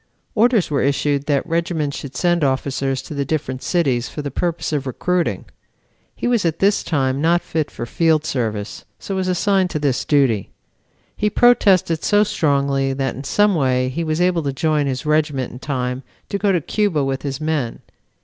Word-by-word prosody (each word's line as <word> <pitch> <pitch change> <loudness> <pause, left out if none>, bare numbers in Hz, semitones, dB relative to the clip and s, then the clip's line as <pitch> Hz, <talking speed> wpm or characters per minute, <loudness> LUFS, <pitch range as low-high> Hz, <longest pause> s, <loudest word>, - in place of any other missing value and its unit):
Orders 225 -6 +3
were 140 - +1
issued 140 +1 0
that 145 -2 +1
regiments 165 -3 -1
should 135 -2 -8
send 175 +1 +1
officers 135 0 -1
to - - -8
the 140 -1 -1
different 135 -3 -3
cities 135 -9 0
for 150 - -6
the 145 - -4
purpose 170 +2 -2
of 140 -2 -1
recruiting. 180 +7 -1 0.7
He - - -3
was 240 -4 +2
at 165 -2 0
this 200 +1 +2
time 135 -4 0
not 170 +2 +2
fit 155 -2 -2
for 120 - -6
field 160 +4 +1
service, 110 -7 -3
so 195 - -6
was 190 -1 -1
assigned 185 +1 +2
to 155 - -2
this 145 -4 0
duty. 130 -9 +2 0.7
He 210 - 0
protested 195 -9 +3
so 205 0 +4
strongly 140 -6 +1
that 135 -1 -2
in 135 - -8
some 205 +8 +3
way 130 -5 +1
he 165 +6 -3
was 155 0 -1
able 180 -1 +2
to 140 -3 -2
join 150 0 +1
his 130 +3 -3
regiment 150 -4 0
in 125 - -10
time 125 -2 -3 0.3
to 200 - -2
go 205 -1 +2
to 175 -3 +1
Cuba 185 -3 0
with 135 0 -2
his 140 -2 -4
men. 155 -6 -2
150 Hz, 190 wpm, -20 LUFS, 135-175 Hz, 0.7 s, so